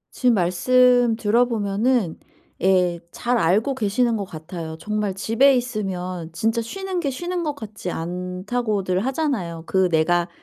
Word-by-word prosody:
지금 250 -2 +3
말씀 245 +6 +4
들어 230 +2 +3
보면은 215 -3 0 0.4
예 180 -2 +3
잘 245 0 0
알고 210 +8 +2
계시는 235 0 +1
것 205 -2 -3
같아요. 160 -1 -7
정말 210 0 -2
"집에 230 +7 +4
있으면 185 -8 -3
진짜 225 +6 0
쉬는 380 +9 -4
게 290 - -1
쉬는 350 +7 -3
것 300 -3 -2
같지 215 -7 -7
않다."고들 185 +3 -2
하잖아요. 255 - -2
그 190 0 +2
내가 175 +2 +2
210 Hz, 275 characters per minute, -22 LUFS, 180-245 Hz, 0.4 s, 말씀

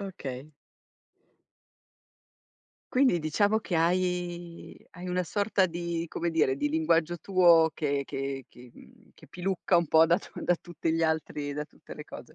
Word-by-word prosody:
Okay. 150 -7 -7 2.4
Quindi 255 -9 +4
diciamo 205 +8 +2
che 200 -5 -5
hai 175 0 -1
hai 180 0 -8
una 180 0 0
sorta 200 0 +1
di 170 -1 -3
come 170 0 -2
dire, 155 -5 +2
di 145 - 0
linguaggio 165 +2 +1
tuo 170 -2 +5
che 145 -2 -1
che 135 0 -4
che 125 0 -15
uhm, - - -19
che - - -17
pilucca 180 -1 0
un 170 - 0
po' 160 +2 +6
da 170 +2 +3
tu - - -14
da 175 - +3
tutti 165 -1 -3
gli 165 - 0
altri, 150 -3 -1
da 150 - -3
tutte - - -14
le - - -9
cose. - - -11
170 Hz, 155 wpm, -28 LUFS, 155-180 Hz, 2.4 s, po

